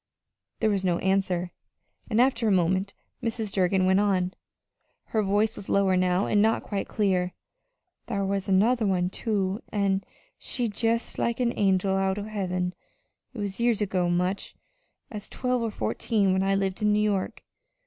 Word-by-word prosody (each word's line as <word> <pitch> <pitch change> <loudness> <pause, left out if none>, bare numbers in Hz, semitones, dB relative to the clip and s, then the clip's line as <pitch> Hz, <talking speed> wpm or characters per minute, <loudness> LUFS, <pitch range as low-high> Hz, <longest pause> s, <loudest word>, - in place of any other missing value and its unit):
There 220 - +3
was 195 -2 0
no 175 -2 +2
answer, 185 -2 0 0.6
and 220 -1 +1
after 245 -2 +3
a - - +3
moment 190 +2 +1 0.3
Mrs. 225 -3 -3
Durgin 185 -1 +2
went 190 +1 +4
on. 190 -3 +1 0.8
Her 220 - +1
voice 205 +2 +1
was 195 - -8
lower 195 -1 +3
now, 180 +1 +2
and 205 - +2
not 220 +1 +2
quite 200 -2 -3
clear. 185 -4 0 0.7
"Thar 200 -4 -1
was 195 0 -2
another 220 +4 +3
one, 180 -1 +1
too, 200 -1 -1
an' 195 -2 +1 0.4
she 250 - -3
was 215 -4 -3
jest 230 0 0
like 235 +1 0
a 240 -1 +1
angel 190 -1 +2
out 195 0 0
o' 205 - -3
heaven. 185 -4 -2 0.6
It - - -8
was 200 -1 -4
years 235 -2 +2
ago 185 -4 0
much 180 +3 -1 0.6
as 210 -2 -7
twelve 250 -1 -1
or 230 - -1
fourteen, 205 -2 0
when 190 - +1
I 195 0 +2
lived 195 0 -1
in 210 0 +3
New 210 - +2
York. 205 -3 -1
195 Hz, 170 wpm, -26 LUFS, 190-215 Hz, 0.8 s, went